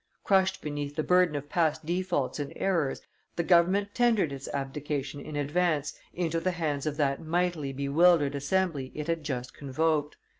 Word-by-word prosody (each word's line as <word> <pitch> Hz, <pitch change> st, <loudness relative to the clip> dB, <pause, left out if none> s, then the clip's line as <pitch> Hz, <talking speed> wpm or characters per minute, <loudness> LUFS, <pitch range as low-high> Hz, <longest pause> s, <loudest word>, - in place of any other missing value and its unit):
Crushed 190 Hz, -1 st, +2 dB
beneath 145 Hz, -1 st, -4 dB
the 155 Hz, -, 0 dB
burden 180 Hz, -3 st, +3 dB
of 145 Hz, 0 st, -4 dB
past 160 Hz, -1 st, 0 dB
defaults 175 Hz, -5 st, -1 dB
and 145 Hz, -1 st, -4 dB
errors, 165 Hz, -8 st, 0 dB, 0.3 s
the 170 Hz, -, 0 dB
government 185 Hz, +4 st, +3 dB
tendered 225 Hz, -, +2 dB
its 135 Hz, 0 st, -7 dB
abdication, 140 Hz, +1 st, -3 dB
in 155 Hz, -, -7 dB
advance, 150 Hz, +1 st, 0 dB, 0.2 s
into 165 Hz, -2 st, -1 dB
the 185 Hz, -, 0 dB
hands 155 Hz, -5 st, -2 dB
of 150 Hz, -1 st, -2 dB
that 140 Hz, -2 st, +1 dB
mightily 170 Hz, -3 st, 0 dB
bewildered 145 Hz, +2 st, +3 dB
Assembly 145 Hz, -1 st, -1 dB
it 150 Hz, -, -4 dB
had 165 Hz, -1 st, -1 dB
just 125 Hz, -4 st, -4 dB
convoked. 150 Hz, +2 st, -1 dB
155 Hz, 160 wpm, -28 LUFS, 145-175 Hz, 0.3 s, burden